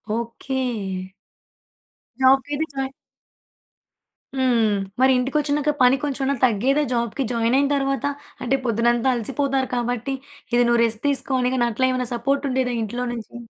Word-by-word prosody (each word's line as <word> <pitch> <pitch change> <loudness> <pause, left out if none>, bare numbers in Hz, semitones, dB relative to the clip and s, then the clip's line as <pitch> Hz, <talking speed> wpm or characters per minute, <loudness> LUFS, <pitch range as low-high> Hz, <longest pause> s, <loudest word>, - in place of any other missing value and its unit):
Okay. 235 +3 -3 1.6
జాబ్‌కైయితే 270 +3 +3
join 270 -1 -3 1.5
హ్మ్. 240 -4 +3 0.3
మరి 260 0 +5
ఇంటికొచ్చినాక 290 +3 0
పని 250 +1 +6
కొంచెం 275 -2 -1 0.2
తగ్గేదా? 255 +6 +2
జాబ్‌కి 235 +3 -1
జాయిన్ 230 +1 +1
అయిన 280 0 +3
తరువాత. 275 -2 -1 0.4
అంటే 255 +2 +2
పొద్దున్నంతా 235 +2 +2
అలసిపోతారు 270 +3 -1
కాబట్టి, 245 +2 -2 0.4
ఇది 245 0 +5
నువ్వు 235 0 +3
రెస్ట్ 220 -1 -4
తీసుకో 275 -1 0
అని 250 0 +1
గాని, 240 -2 +2
అట్లా 260 +4 +1
ఏమైనా 255 -1 -1
సపోర్టుండేదా 260 0 0
ఇంట్లో 240 +4 -3
నుంచి? 230 0 -8
255 Hz, 125 wpm, -22 LUFS, 235-275 Hz, 1.6 s, పని